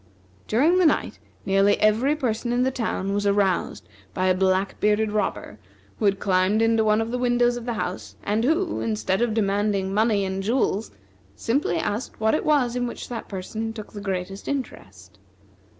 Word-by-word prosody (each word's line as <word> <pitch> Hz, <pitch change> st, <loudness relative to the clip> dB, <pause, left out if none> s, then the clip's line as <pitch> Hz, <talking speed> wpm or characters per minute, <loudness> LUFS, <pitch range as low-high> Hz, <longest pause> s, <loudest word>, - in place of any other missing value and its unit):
During 310 Hz, +11 st, +3 dB
the 365 Hz, -, +4 dB
night 300 Hz, -, 0 dB, 0.3 s
nearly 195 Hz, +1 st, +3 dB
every 230 Hz, +8 st, +3 dB
person 240 Hz, -4 st, -2 dB
in 245 Hz, +1 st, +2 dB
the 260 Hz, -, +1 dB
town 200 Hz, -5 st, -2 dB
was 205 Hz, 0 st, 0 dB
aroused 200 Hz, -2 st, 0 dB, 0.3 s
by 185 Hz, -, 0 dB
a 185 Hz, -, +4 dB
black 190 Hz, +1 st, 0 dB
bearded 210 Hz, +1 st, +2 dB
robber, 210 Hz, 0 st, -3 dB, 0.4 s
who 215 Hz, -, 0 dB
had 195 Hz, -1 st, +2 dB
climbed 190 Hz, +2 st, +2 dB
into 225 Hz, 0 st, +3 dB
one 215 Hz, 0 st, +3 dB
of 225 Hz, +1 st, -3 dB
the 250 Hz, -, -2 dB
windows 245 Hz, 0 st, +2 dB
of 240 Hz, -1 st, -6 dB
the 240 Hz, -, -1 dB
house, 110 Hz, -, -5 dB
and 210 Hz, +2 st, 0 dB
who, 325 Hz, +7 st, +1 dB
instead 215 Hz, -2 st, -1 dB
of 235 Hz, -2 st, +1 dB
demanding 200 Hz, -2 st, 0 dB
money 210 Hz, -1 st, +2 dB
and 190 Hz, 0 st, -3 dB
jewels, 220 Hz, -1 st, 0 dB, 0.5 s
simply 230 Hz, -, 0 dB
asked 210 Hz, +8 st, -3 dB
what 220 Hz, 0 st, +2 dB
it -, -, 0 dB
was 265 Hz, -6 st, +2 dB
in 245 Hz, 0 st, -1 dB
which -, -, -7 dB
that 235 Hz, -2 st, -6 dB
person 215 Hz, +4 st, -5 dB
took 215 Hz, -2 st, -9 dB
the 205 Hz, -, -7 dB
greatest 195 Hz, 0 st, -4 dB
interest. 100 Hz, -, -6 dB
215 Hz, 180 wpm, -24 LUFS, 195-240 Hz, 0.5 s, the